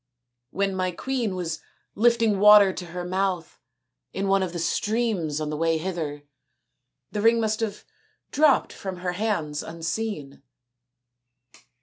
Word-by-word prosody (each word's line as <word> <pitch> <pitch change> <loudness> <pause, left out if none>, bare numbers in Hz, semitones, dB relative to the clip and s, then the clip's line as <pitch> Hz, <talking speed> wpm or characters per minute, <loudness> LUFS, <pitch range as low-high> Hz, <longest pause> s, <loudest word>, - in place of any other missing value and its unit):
" 120 0 -57
When 195 +3 -1
my 185 -1 0
queen 230 +2 -2
was 165 -3 -4 0.3
lifting 230 -2 +3
water 205 -2 +8
to 180 - -6
her 175 +1 -6
mouth 185 -3 -2 0.5
in 195 +1 -2
one 195 0 +3
of 185 -2 -2
the 175 - -5
streams 200 -4 -1
on 155 -1 -3
the - - -2
way 165 +1 +1
hither, 160 -4 -4 0.9
the 210 - -2
ring 230 +2 +4
must 220 -1 0
have 215 -2 -4 0.5
dropped 290 -2 +3
from 190 -2 -6
her 180 - +1
hands 175 -7 -2
unseen." 165 -2 -4
190 Hz, 140 wpm, -25 LUFS, 165-215 Hz, 0.9 s, water